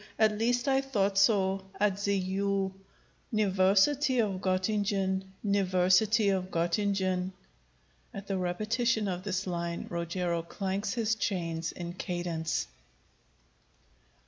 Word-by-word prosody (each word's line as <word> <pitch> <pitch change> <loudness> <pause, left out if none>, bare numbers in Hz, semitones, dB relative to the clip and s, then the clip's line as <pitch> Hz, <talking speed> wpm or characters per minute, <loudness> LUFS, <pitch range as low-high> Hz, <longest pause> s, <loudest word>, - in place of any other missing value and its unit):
At 215 -1 +3
least 245 +4 0
I 270 0 +3
thought 200 -7 +1
so 195 -2 +3 0.2
at 205 -1 +1
the 200 0 +2
U 195 +1 -1 0.6
niversity 210 +7 +3
of 200 -4 0
Gottingen, 190 0 0 0.2
niversity 200 +1 +3
of 185 -1 0
Gottingen. 185 +1 0 0.8
[_At 195 - -8
the 195 -1 -2
repetition 215 +5 0
of 180 -1 -2
this 190 -1 -2
line 170 -2 -3
Rogero 170 0 -1
clanks 195 +4 -3
his 225 -2 +1
chains 165 -6 -2
in 175 -1 -6
cadence. 175 -3 -2
195 Hz, 110 wpm, -30 LUFS, 180-210 Hz, 0.8 s, At